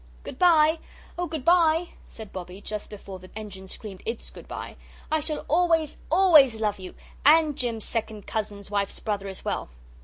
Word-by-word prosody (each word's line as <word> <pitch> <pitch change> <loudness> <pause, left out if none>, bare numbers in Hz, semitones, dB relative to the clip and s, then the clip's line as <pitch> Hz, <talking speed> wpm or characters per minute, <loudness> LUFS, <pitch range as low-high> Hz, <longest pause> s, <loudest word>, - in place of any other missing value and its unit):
"Good - - -8
bye 320 -2 +5 0.4
oh, 355 0 -2
good 310 -4 -5
bye," 340 -1 +4 0.2
said 220 -3 -11
Bobbie, 180 0 -7
just 210 0 -5
before 195 -2 -9
the 185 0 -13
engine 200 -3 -8
screamed 195 -1 -8
ITS 230 0 -4
good - - -12
bye. - - -7 0.4
"I 315 - +3
shall 305 0 -4
always, 325 -2 +2
always 315 -9 +7
love 210 -2 -1
you 185 -1 -9 0.3
and 305 0 +6
Jim's 235 -5 -3
second 220 -3 -4
cousin's 205 -2 -4
wife's 200 -1 -1
brother 205 -2 -2
as 190 -1 -7
well!" - - -2
225 Hz, 175 wpm, -26 LUFS, 200-315 Hz, 0.4 s, always